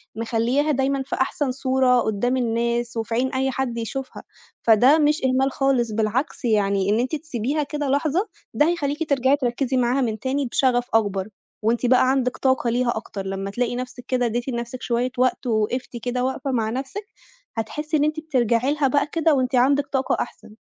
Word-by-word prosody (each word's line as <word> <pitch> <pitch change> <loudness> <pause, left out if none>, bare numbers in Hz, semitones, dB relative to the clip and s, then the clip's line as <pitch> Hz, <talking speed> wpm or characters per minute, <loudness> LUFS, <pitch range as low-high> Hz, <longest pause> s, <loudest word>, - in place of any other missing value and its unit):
مخلياها 235 +6 0
دايمًا 270 0 0
في - - -3
أحسن 265 +1 0
صورة 260 -1 +2
قدّام 240 +4 0
الناس 235 0 -1
وفي 225 0 -3
عين 260 +2 +1
أي 265 0 0
حد 255 -2 -2
يشوفها، 260 +4 -5 0.4
فده 245 +7 +6
مش 300 +1 +2
إهمال 260 +1 +2
خالص، 260 -4 +1
بالعكس 225 +5 -1
يعني 200 -3 +2
إن 215 +3 +2
أنتِ 255 +6 -1
تسيبيها 295 -1 -2
كده 290 0 -3
لحظة، 310 +8 +1 0.3
ده 295 - +3
هيخليكِ 310 -2 -1
ترجعي 270 0 +3
تركزي 260 0 -1
معاها 250 +2 +2
من 220 -4 -1
تاني 270 +3 -1
بشغف 245 0 +1
أكبر 200 -3 +1 0.4
وأنتِ 235 +3 +1
بقى 255 +1 +4
عندِك 250 -2 0
طاقة 260 -3 +1
ليها 240 0 +1
أكتر، 200 -3 -6
لمّا 195 +1 -3
تلاقي 245 +2 -1
نفْسِك 250 0 -6
كده 250 -1 +1
اديتِ 240 +2 -2
لنفْسِك 240 +1 -4
شوية 245 +1 0
وقت 255 +1 +1
ووقفتِ 235 +3 -1
كده 250 0 -1
وقفة 265 +1 -2
مع 225 -4 0
نفْسِك، 270 - -5 0.5
هتحسّي 300 +8 -2
إن 290 - +2
أنتِ 305 +1 0
بترجعي 255 -3 +1
لها 295 -2 +1
بقى 285 +3 +1
كده 325 -2 +2
وأنتِ 255 -1 +1
عندِك 275 +3 +3
طاقة 265 -1 0
أحسن. 215 -2 -7
255 Hz, 180 wpm, -23 LUFS, 235-275 Hz, 0.5 s, فده